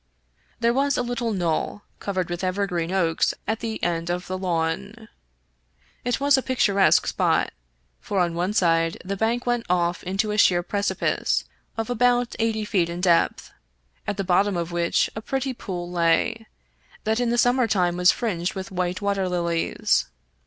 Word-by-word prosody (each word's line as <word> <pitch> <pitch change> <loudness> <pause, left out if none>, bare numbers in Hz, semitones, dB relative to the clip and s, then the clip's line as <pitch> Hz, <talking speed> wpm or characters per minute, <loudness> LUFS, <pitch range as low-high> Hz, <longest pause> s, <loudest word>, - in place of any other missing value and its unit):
There 235 0 +2
was 280 +2 +1
a 250 - +1
little 240 -1 -2
knoll 175 +1 -1 0.2
covered 185 -3 -2
with 175 +1 -4
evergreen 185 -2 -1
oaks 170 -4 +1
at 220 +1 -1
the 225 -1 -3
end 170 -1 -1
of 180 +1 -2
the 185 - -4
lawn. 185 +5 -2 0.9
It 245 0 0
was 280 -1 +4
a - - -2
picturesque 200 -7 +3
spot, - - +1 0.5
for 200 - -2
on 175 -2 +1
one 180 +4 -1
side 165 -4 +2
the 200 +1 -2
bank 230 +4 0
went 240 -1 0
off 175 -1 +1
into 195 +3 -1
a 210 - 0
sheer 175 -3 +4
precipice 200 +3 0 0.3
of 225 -1 -2
about 245 0 +2
eighty 220 -1 0
feet 180 -5 +1
in 170 +1 -5
depth, 175 -2 +2 0.6
at 205 - -2
the 195 - -1
bottom 190 +1 +2
of 170 0 -3
which 170 0 +1
a 220 - -4
pretty 265 +2 -2
pool 180 -6 -6
lay, 180 +7 +1 0.6
that 220 +2 0
in 245 -1 +1
the 240 - +1
summer 245 0 +3
time 180 -5 +1
was 180 0 +5
fringed 180 -7 -2
with 190 0 -6
white 180 +1 -2
water 200 -2 0
lilies. 170 - 0
195 Hz, 170 wpm, -24 LUFS, 175-225 Hz, 0.9 s, was